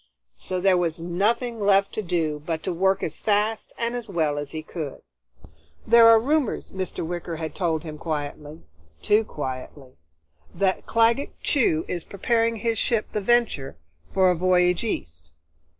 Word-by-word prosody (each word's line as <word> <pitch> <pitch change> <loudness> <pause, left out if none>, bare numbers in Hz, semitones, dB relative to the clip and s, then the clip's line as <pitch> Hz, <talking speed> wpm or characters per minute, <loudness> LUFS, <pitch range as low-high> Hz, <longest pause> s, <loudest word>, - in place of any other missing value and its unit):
So 185 - -3
there 185 -1 +3
was 170 -2 -1
nothing 220 +8 -1
left 200 -1 +3
to - - -2
do 165 -5 -1
but 160 0 -3
to 185 - -2
work 190 +3 +1
as 155 - -4
fast 210 +1 0
and 235 +1 -2
as 240 -3 -6
well 155 -5 0
as 145 -1 -5
he 155 +1 -6
could. 155 -4 -6 0.8
"There 230 0 +7
are 225 0 +8
rumors," 280 +1 0
Mr. 185 -3 -4
Wicker 175 0 -4
had 160 0 -5
told 165 -4 -1
him 155 -2 -8
quietly, 150 -1 -5 0.4
too 210 +2 +4
quietly, 130 -5 -7 0.6
"that 190 -1 0
Claggett 230 +5 +2
Chew 165 - +2
is 175 -2 -4
preparing 230 +3 0
his 225 0 -1
ship, 230 -3 0
the 210 - -2
Venture, 220 - +1 0.3
for 185 -1 +4
a - - +1
voyage 180 +1 +2
East. 80 - -5
185 Hz, 160 wpm, -24 LUFS, 160-225 Hz, 0.8 s, are